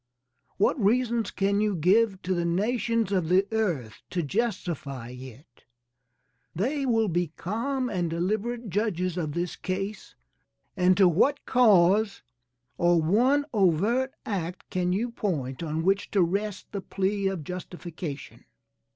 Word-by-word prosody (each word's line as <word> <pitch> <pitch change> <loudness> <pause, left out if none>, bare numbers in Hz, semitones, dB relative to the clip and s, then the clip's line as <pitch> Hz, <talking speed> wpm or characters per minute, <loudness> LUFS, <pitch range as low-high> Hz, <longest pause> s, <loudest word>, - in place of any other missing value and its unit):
What 210 +4 +2
reasons 235 +1 +2
can 200 +1 0
you 210 -2 +1
give 190 +4 +2
to 185 - 0
the 175 -1 0
nations 225 +4 0
of 180 -5 0
the 185 +2 +4
earth 170 - -2
to 175 -2 -1
justify 155 - -3
it? 125 +1 -12 0.9
They 270 - -1
will 225 -3 +2
be 175 -3 -1
calm 255 +7 -2
and 180 -7 -1
deliberate 215 +7 -2
judges 185 -3 -1
of 155 -5 -3
this 175 +1 -2
case, 195 +3 -5 0.6
and 185 -1 +3
to 195 -2 +6
what 270 - +2
cause, 210 -3 +4 0.6
or 175 0 +4
one 245 - +3
overt 215 - +2
act 180 -4 -4
can 180 -1 0
you 230 +6 -1
point 145 - -3
on 160 0 -2
which 195 +2 +1
to 190 - +6
rest 200 +3 -3
the 200 - -4
plea 195 +1 -1
of 190 -5 -3
justification? 175 -3 -7
190 Hz, 135 wpm, -27 LUFS, 170-220 Hz, 0.9 s, to